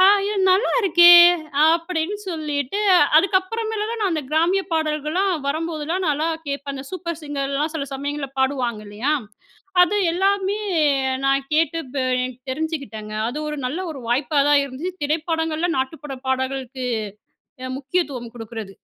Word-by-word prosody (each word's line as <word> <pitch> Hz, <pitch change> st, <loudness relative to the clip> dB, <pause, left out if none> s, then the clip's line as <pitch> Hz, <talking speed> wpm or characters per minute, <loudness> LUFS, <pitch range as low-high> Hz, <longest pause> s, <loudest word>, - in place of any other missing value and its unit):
ஆ, -, -, +7 dB, 0.2 s
இது 420 Hz, 0 st, -2 dB
நல்லா 380 Hz, +5 st, +3 dB
இருக்கே 345 Hz, -3 st, +7 dB, 0.6 s
அப்படின்னு 335 Hz, +3 st, -1 dB
சொல்லிட்டு 300 Hz, 0 st, -2 dB, 0.4 s
அதுக்கப்புறமேல 420 Hz, +5 st, +1 dB
நான் 400 Hz, -3 st, +1 dB
அந்த 310 Hz, -2 st, -1 dB
கிராமிய 335 Hz, +5 st, +2 dB
பாடல்கள்லா 310 Hz, +3 st, 0 dB, 0.2 s
வரும்போதெல்லா 315 Hz, +2 st, -2 dB
நான்லாம் 310 Hz, +2 st, 0 dB
கேட்பன். 280 Hz, 0 st, -4 dB
அந்த 265 Hz, 0 st, -7 dB
சூப்பர் 340 Hz, -3 st, -4 dB
சிங்கர்லலாம் 290 Hz, +1 st, -2 dB
சில 285 Hz, -3 st, -3 dB
சமயங்கள்ல 285 Hz, +1 st, -4 dB
பாடுவாங்க 255 Hz, -5 st, 0 dB
இல்லையா, 215 Hz, +8 st, -2 dB, 0.7 s
அது 360 Hz, +4 st, +3 dB, 0.2 s
எல்லாமே 395 Hz, +2 st, +1 dB, 0.7 s
நான் 275 Hz, 0 st, +1 dB
கேட்டு 320 Hz, +1 st, +2 dB
இப்ப 265 Hz, +2 st, -5 dB, 0.2 s
எனக்கு 255 Hz, 0 st, -5 dB
தெரிஞ்சுக்கிட்டேங்க. 275 Hz, -8 st, -5 dB
அது 245 Hz, +5 st, -4 dB
ஒரு 300 Hz, -, -4 dB
நல்ல 275 Hz, +8 st, -3 dB
ஒரு 275 Hz, -4 st, -8 dB
வாய்ப்பா 270 Hz, +4 st, +1 dB
தான் 290 Hz, -1 st, +5 dB
இருந்துச்சு. 280 Hz, +7 st, -5 dB
திரைப்படங்கள்ல 320 Hz, +2 st, -1 dB
நாட்டுப்புறபாடல்களுக்கு 260 Hz, -2 st, -3 dB, 0.8 s
அ -, -, -4 dB
முக்கியத்துவம் 270 Hz, -5 st, -3 dB
குடுக்கிறது. 225 Hz, -3 st, -7 dB
300 Hz, 125 wpm, -22 LUFS, 270-340 Hz, 0.8 s, ஆ